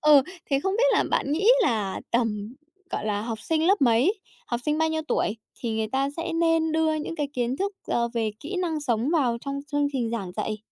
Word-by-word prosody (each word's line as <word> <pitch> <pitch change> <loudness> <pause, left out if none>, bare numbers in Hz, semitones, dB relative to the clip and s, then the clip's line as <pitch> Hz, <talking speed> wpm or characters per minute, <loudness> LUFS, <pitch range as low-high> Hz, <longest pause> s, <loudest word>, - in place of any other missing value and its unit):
Ừ, 300 -2 +7 0.3
thế 275 0 +3
không 385 - 0
biết - - +4
là - - +3
bạn 280 - +1
nghĩ 390 +8 +2
là, 215 - 0
tầm, 225 -1 -1 0.4
gọi - - -3
là, 205 -1 0
học 225 -1 -4
sinh 320 +4 +1
lớp 395 -1 +4
mấy, 245 - +4 0.3
học 240 0 -2
sinh 300 0 +1
bao 320 - +3
nhiêu 315 0 -1
tuổi, 215 - 0 0.2
thì 225 -2 -2
người 220 -1 -1
ta 270 +1 +1
sẽ 330 0 -3
nên 330 -1 +2
đưa 320 0 +2
những 310 +2 -4
cái 290 -2 -1
kiến 250 0 -1
thức, 400 +3 -1
ờ, 235 0 +1
về 225 -2 0
kỹ 370 +6 -5
năng 330 -4 -1
sống 245 0 0
vào 255 -8 +2
trong 280 0 -4
chương 290 0 +2
trình 240 -4 -1
giảng 195 -6 -4
dạy? 215 +3 -3
275 Hz, 230 wpm, -26 LUFS, 230-320 Hz, 0.4 s, Ừ